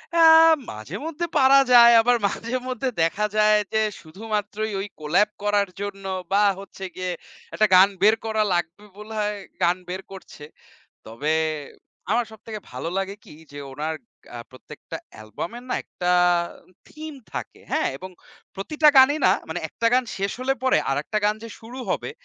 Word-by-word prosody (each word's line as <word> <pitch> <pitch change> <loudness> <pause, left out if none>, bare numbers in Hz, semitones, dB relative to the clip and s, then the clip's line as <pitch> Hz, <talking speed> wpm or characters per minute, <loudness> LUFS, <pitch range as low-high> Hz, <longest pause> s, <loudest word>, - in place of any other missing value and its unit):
আ - - +2 0.5
মাঝে-মধ্যে 275 - -5
পারা 275 0 +6
যায়। 235 -1 +9
আবার 245 +1 +3
মাঝে-মধ্যে 255 +4 -3
দেখা 195 +6 +1
যায় 215 0 +5 0.2
যে, 220 - +2 0.2
শুধুমাত্রই 210 +4 -4
ওই 200 - -4
collab 175 +8 +2
করার 205 -1 +1
জন্য, 195 -1 -6 0.3
বা 205 +1 +4 0.2
হচ্ছে 195 -1 -11
গিয়ে 185 -1 -3 0.4
একটা 215 - +3
গান 190 +2 +7
বের 215 +2 +6
করা 220 -1 +1
লাগবে 175 +4 -3
বলে 210 +1 -9
হয় 210 0 -1 0.3
গান 175 +1 +3
বের 185 +1 -4
করছে। 190 -5 -12 0.6
তবে 130 +8 -2 0.8
আমার 235 +2 +2
সবথেকে 220 0 -8
ভালো 130 +6 -5
লাগে 195 +1 -3
কি, - - -14 0.2
যে 145 - -9
ওনার 155 +4 -3 0.4
আ - - -6
প্রত্যেকটা 130 - -10 0.3
album-এর 175 - -7
না - - +1
একটা 180 0 -3 0.8
theme 305 -2 -9
থাকে। - - -7
হ্যাঁ? - - +1
এবং 185 - -9 0.4
প্রতিটা 300 +10 +2
গানই 275 +3 +7
না, 185 - +6 0.2
মানে 170 +2 -3
১ - - -32
টা 230 - +5
গান 255 0 +3
শেষ 195 0 -1
হলে 270 +1 0
পরে 260 - +4
আরেকটা 150 +10 -1
গান 210 +1 +3
যে 230 - -7
শুরু 235 +3 -10
হবে, - - -2
210 Hz, 160 wpm, -23 LUFS, 185-235 Hz, 0.8 s, যায়